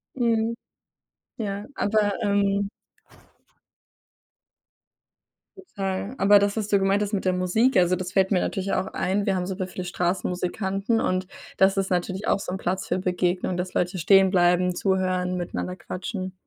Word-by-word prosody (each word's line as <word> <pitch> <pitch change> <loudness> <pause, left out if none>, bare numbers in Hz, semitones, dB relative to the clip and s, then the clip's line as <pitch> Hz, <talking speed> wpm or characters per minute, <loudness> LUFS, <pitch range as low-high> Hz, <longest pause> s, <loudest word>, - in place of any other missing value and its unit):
Mhm, 230 -2 +1 0.9
ja 205 -2 -4
aber, 205 -1 +1
ähm 200 -1 +1 2.9
Total, 200 - -4
aber 205 +1 +6
das, 200 +2 0
was 210 -1 -1
du 200 -1 +3
gemeint 195 +2 +2
hast 205 - -4
mit 195 - -1
der 185 - +2
Musik, 185 +8 +2
also, 180 0 +4
das 185 0 -5
fällt 190 0 +2
mir 185 - +3
natürlich 195 -1 -2
auch 185 +1 0
ein. 200 +2 -1
Wir 195 - +2
haben 180 -1 -1
super 185 0 -4
viele 180 0 -6
Straßenmusikanten 190 +4 -1
und 185 -2 -1 0.3
das 195 +1 +4
ist 195 -1 -1
natürlich 185 +3 -1
auch - - +2
so 190 - -5
'n 190 - -3
Platz 190 +1 -2
für - - 0
Begegnungen, 180 0 -1
dass 180 +1 -4
Leute 180 +1 0
stehen 190 +2 +5
bleiben, 180 0 +3
zuhören, 185 -1 0
miteinander 180 +1 -4
quatschen. 185 +2 -5
190 Hz, 155 wpm, -25 LUFS, 180-200 Hz, 2.9 s, aber